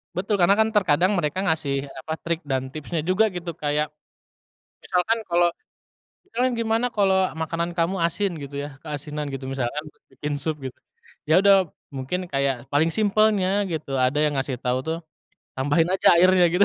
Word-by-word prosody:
Betul, 195 +4 0
Karena 185 +3 +5
kan 220 +1 +3
terkadang 185 -3 +3
mereka 155 +1 -1
ngasih 145 -6 0 0.2
apa 160 - -3
trik 170 0 -2
dan 130 -1 -2
tipsnya 155 +3 -3
juga 185 +6 +3
gitu 175 -1 -5
kayak. 150 0 -1 0.9
Misalkan 195 +5 +1
kalau, 175 0 +4 0.8
kita 385 - -29
kan 255 - +2
gimana 230 +1 +1
kalau 195 -3 +2 0.2
makanan 165 +2 -2
kamu 170 +2 +1
asin? 190 +4 0
Gitu 140 0 -8
ya 145 - -5
keasinan 150 -1 -5
gitu 135 -1 -6
misalkan 135 +2 -2 0.3
bikin 145 0 -4
sup 155 +1 -1
gitu 130 -1 -6 0.5
ya 155 - +6
udah 195 -4 +5 0.2
mungkin 135 +8 -3
kayak 135 -4 -1
paling 155 +3 +3
simpelnya 215 -2 +2 0.2
gitu 155 -4 -4
ada 130 +3 +2
yang 150 - 0
ngasih 135 -1 -2
tau 125 +1 0
tuh, 160 +1 -1 0.6
tambahin 145 +5 +2
aja 190 -2 +5
airnya 185 +1 +5
gitu 185 +3 +5
165 Hz, 165 wpm, -24 LUFS, 145-185 Hz, 0.9 s, ya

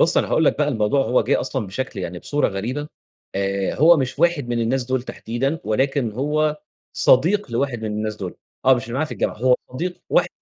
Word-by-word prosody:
بُصّ 170 - +4
أنا - - +2
هاقول 160 - +2
لك - - +2
بقى 150 -1 +2
الموضوع 115 0 +1
هو 125 - +3
جه - - +1
أصلًا 130 -4 -2
بشكل 105 +1 -4
يعني 90 -1 -5
بصورة 145 +10 0
غريبة، 125 +10 -4 0.5
آآ، 100 0 -1
هو 165 +4 +6
مش 130 -1 -2
واحد 165 -6 +2
من 120 -1 0
الناس 125 +2 0
دول 130 0 -1
تحديدًا، 135 +5 -3
ولكن 130 +1 0
هو 150 +4 0 0.4
صديق 170 +5 +3
لواحد 120 -1 -1
من - - -2
الناس 105 0 -3
دول، 95 -4 -6 0.3
آه، 130 0 +7
مش 120 - -3
اللي 115 - -8
معايا 155 +4 0
في - - -6
الجامعة، - - -1
هو 125 +3 +4 0.2
صديق 175 +7 -3
واحد - - +3
130 Hz, 215 wpm, -22 LUFS, 110-145 Hz, 0.5 s, آه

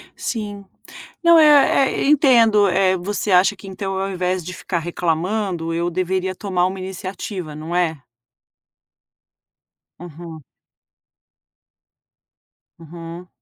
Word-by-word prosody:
Sim, 205 -3 -5 0.6
não 335 -1 +6
é 290 -3 +5
é - - -2
entendo, 230 -8 +4
eh, 190 +1 +2
você 205 +3 -3
acha 190 +2 +4
que 195 0 -12
então 195 0 -5
ao 195 +1 -2
invés 185 -1 -2
de 180 - -6
ficar 175 0 -4
reclamando 175 +1 -2
eu 170 +1 -1
deveria 185 +1 -2
tomar 185 -3 -1
uma 190 +1 -4
iniciativa, 185 -3 -6
não 155 +3 -6
é? 165 -4 0 2.0
Uhum. 165 -2 -10 2.4
Uhum. 170 +2 -10
185 Hz, 105 wpm, -20 LUFS, 175-200 Hz, 2.4 s, não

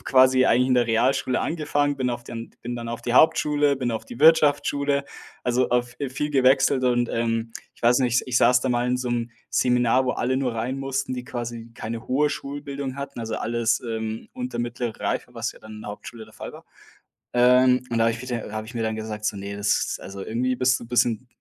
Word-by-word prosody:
habe - - -22
quasi 130 0 +5
eigentlich 125 +3 +3
in 130 - +3
der 120 -1 +3
Realschule 125 +3 +1
angefangen, 145 -3 0
bin 130 -1 0
auf 120 0 -5
den 115 0 -7
bin 120 +1 -4
dann 115 -1 -6
auf 115 0 -5
die 120 - -2
Hauptschule, 145 +1 +4
bin 125 -2 -2
auf 110 - -4
die - - -9
Wirtschaftsschule. 145 -2 +4 0.4
Also, 125 +1 +1
auf 120 0 0
äh, 140 - -1
viel 150 +3 -3
gewechselt 135 -1 +3
und, 120 -1 +2
ähm, 115 0 -1 0.2
ich - - -24
weiß 120 +1 +5
nicht, 125 -1 +2
ich 125 -1 +2
saß 125 0 +4
da 130 - 0
mal 120 0 +1
in 125 - +1
so 125 -1 -3
'nem 120 0 -2 0.2
Seminar, 125 +1 +2
wo 125 - +1
alle 130 +2 0
nur 130 -3 -1
rein 125 +4 -2
mussten, 135 -1 -2
die 125 -1 -4
quasi 120 -1 -6
keine 115 0 -6
hohe 145 +3 +2
Schulbildung 140 -1 -5
hatten, 140 -3 -6
also, 110 -1 -4
alles, 115 0 0
ähm, 110 - -4
unter 255 0 -5
mittlere 120 -1 -3
Reife, 125 - -3
was 115 0 -3
ja - - -17
dann 110 0 -11
in 105 - -9
der 105 - -6
Hauptschule 110 +2 -9
der 110 - -19
Fall - - -8
war. - - -13 0.7
Ähm, 125 +1 +5
und 115 - -1
da 115 - +3
habe - - +3
ich 115 - -7
mir 125 - -8
da - - -8
äh, - - -10
habe 110 0 -4
ich 125 - -10
mir 115 - -1
dann 110 0 -1
gesagt, 110 -1 -5
so: 105 - 0
„Ne, 100 +1 -6
das 105 0 0
also, 100 0 -7
irgendwie 125 +4 -1
bist 130 +1 +2
du - - -9
bisschen,- 120 0 +1
125 Hz, 235 wpm, -24 LUFS, 115-130 Hz, 0.7 s, quasi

